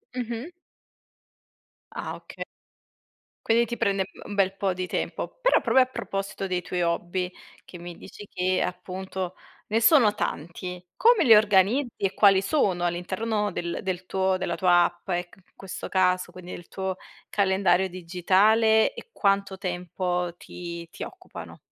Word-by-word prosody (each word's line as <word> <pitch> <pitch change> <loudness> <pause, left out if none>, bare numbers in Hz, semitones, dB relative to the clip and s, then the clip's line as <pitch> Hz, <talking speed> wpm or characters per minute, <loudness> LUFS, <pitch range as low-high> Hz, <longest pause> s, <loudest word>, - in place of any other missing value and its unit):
Mh-mh. 240 +5 -4 1.4
Ah - - -5
okay. - - -8 1.0
Quindi 230 +1 +4
ti 235 +1 -4
prende, 200 -5 0
mhmm, - - -12
un 205 - -5
bel 195 -1 +2
po' 195 -2 0
di 180 0 -4
tempo - - -4
però - - +4
proprio 260 - +4
a 255 - -7
proposito 195 -5 -4
dei 180 -1 -1
tuoi 180 0 -3
hobby, 175 +2 -1 0.4
che 180 - -11
mi 175 0 -9
dici 205 - -11
che, 185 0 0
appunto, 185 0 -4 0.3
ne 225 +2 +1
sono 230 -6 +6
tanti. 180 -1 -4
Come 470 -1 +5
li 225 -3 +9
organizzi? 215 +5 +4
E 195 -1 -1
quali 195 -2 +5
sono 195 - +1
all'interno 205 +5 -1
del 170 -1 -3
del 185 -1 -3
tuo 190 0 +1
della 175 - -2
tua 175 -2 +5
app 175 +2 -6
e 175 0 -1
c - - -19
in 190 - -24
questo 195 -2 -7
caso 185 -1 +2
quindi 180 0 -10
del 175 - -9
tuo 190 -1 -3 0.3
calendario 190 -1 +2
digitale 195 - +3
e 485 - -11
quanto 195 - +1
tempo 180 -1 -2
ti 170 -1 -8
ti - - -7
occupano? 370 0 -10
190 Hz, 155 wpm, -26 LUFS, 180-210 Hz, 1.4 s, li